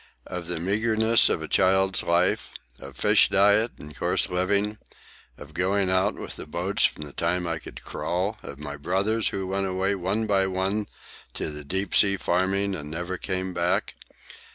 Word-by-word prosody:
"Of 90 -2 -6
the 90 -2 -3
meagreness 110 +4 +3
of 80 - -1
a - - -5
child's 95 +4 +2
life? 85 +2 +1 0.3
of 70 -1 -11
fish - - +4
diet 105 +4 +3
and 75 0 -11
coarse - - 0
living? 100 +4 0 0.6
of 75 +1 -12
going 95 +2 +1
out 95 +2 +2
with - - -5
the - - -8
boats 90 +5 +2
from - - -1
the 70 -2 -9
time 90 +1 0
I 85 -1 -2
could - - -11
crawl? 95 +5 -2
of 70 - -9
my 75 0 -6
brothers, 100 +8 0
who 95 - -2
went 95 +1 -1
away 95 +1 0
one 100 +4 -1
by 100 -2 +2
one 95 +3 -1 0.5
to - - -3
the 75 0 -7
deep 95 +7 -3
sea 100 -1 +5
farming 95 +3 0
and 75 -5 -6
never 85 +3 -4
came 95 -1 -3
back? 90 +1 0
95 Hz, 175 wpm, -25 LUFS, 85-100 Hz, 0.6 s, sea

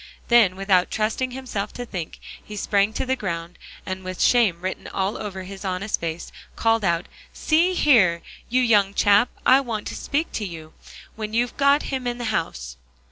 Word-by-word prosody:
Then 230 -6 +5
without 190 -2 +2
trusting 220 +4 -1
himself 245 -6 -5
to 245 - -6
think, 180 -8 -6 0.2
he 210 - -9
sprang 200 0 +1
to - - -2
the 260 0 0
ground, 170 -5 -5 0.3
and 190 0 -5
with 185 0 -6
shame 215 -9 +3
written 185 +1 -4
all 195 +2 -2
over 190 -3 -6
his 195 +1 -9
honest 195 +2 -2
face, 165 0 -5 0.2
called 225 -1 +2
out, 170 -1 +1 0.3
"See 340 +4 +2
here, 205 - +4 0.3
you 255 +2 +2
young 205 -4 +3
chap, 205 +3 +4 0.2
I 265 +2 +6
want 225 -5 -4
to - - -6
speak 305 +4 -2
to 215 - -3
you, 160 -5 -8 0.4
when 215 0 -5
you've 240 +1 0
got 280 +1 +3
him 260 -2 -2
in 240 0 -2
the 240 - -4
house." - - -3
205 Hz, 185 wpm, -23 LUFS, 185-245 Hz, 0.4 s, I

